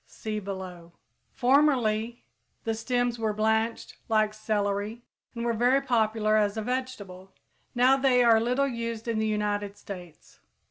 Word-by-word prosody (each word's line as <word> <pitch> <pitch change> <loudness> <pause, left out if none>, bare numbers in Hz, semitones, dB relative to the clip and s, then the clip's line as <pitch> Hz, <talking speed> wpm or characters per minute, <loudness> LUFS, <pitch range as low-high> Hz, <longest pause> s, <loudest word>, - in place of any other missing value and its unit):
(See 215 -1 -5
below.) 185 -4 -8 0.4
Formerly 245 -4 +2 0.4
the 225 - -1
stems 245 +1 -1
were 220 -2 0
blanched 220 +1 0
like 215 -1 +2
celery 210 +1 -2 0.3
and 235 0 -3
were 235 - +1
very 245 +4 +3
popular 220 -4 +1
as 205 0 +1
a 220 - -2
vegetable; 210 -7 -5 0.4
now 255 +2 +5
they 260 -2 +4
are 230 -2 +6
little 250 +4 +1
used 230 -2 -4
in 230 -2 0
the 220 - 0
United 205 -1 -2
States. 180 -5 -11
220 Hz, 140 wpm, -27 LUFS, 210-245 Hz, 0.4 s, are